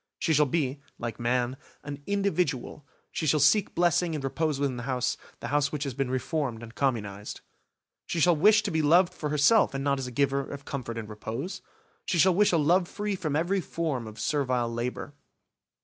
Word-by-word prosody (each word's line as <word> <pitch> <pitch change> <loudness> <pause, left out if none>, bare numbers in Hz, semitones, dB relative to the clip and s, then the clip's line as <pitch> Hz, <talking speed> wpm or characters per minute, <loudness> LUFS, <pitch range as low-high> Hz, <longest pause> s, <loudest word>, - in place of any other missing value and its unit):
She 160 - +1
shall 150 0 +4
be, 140 -1 -1 0.2
like 120 -1 -5
man, 120 +2 0 0.3
an 145 0 -7
individual, 180 -9 -1 0.2
she 155 - -2
shall 150 +1 +3
seek 165 +9 +3
blessing 175 -1 +2
and 145 - -4
repose 150 +1 -1
within 140 -3 -1
the - - -4
house, 125 -1 0 0.3
the - - -4
house 145 -1 +1
which 150 -2 -3
has 140 -3 -3
been 135 0 -2
reformed 130 -2 -2
and 115 0 -10
communised. 105 -7 -2 0.7
She 170 - -2
shall 175 +2 +5
wish 210 +6 +5
to 200 - -2
be 160 -1 +1
loved 175 +4 +4
for 150 -4 -4
herself 150 +5 +4
and 135 - -2
not 140 -1 +1
as 130 - -4
a - - -6
giver 140 +2 +1
of 140 0 -8
comfort 120 -5 -5
and 110 -2 -5
repose. 115 - -5 0.4
She 175 - -1
shall 185 +3 +5
wish 205 +3 +4
a 170 - +3
love 175 +4 +3
free 205 +1 -3
from 155 -6 -2
every 180 +5 +1
form 155 -9 -3
of 110 +1 -10
servile 125 -3 0
labour. 125 +4 -4
145 Hz, 200 wpm, -28 LUFS, 125-170 Hz, 0.7 s, shall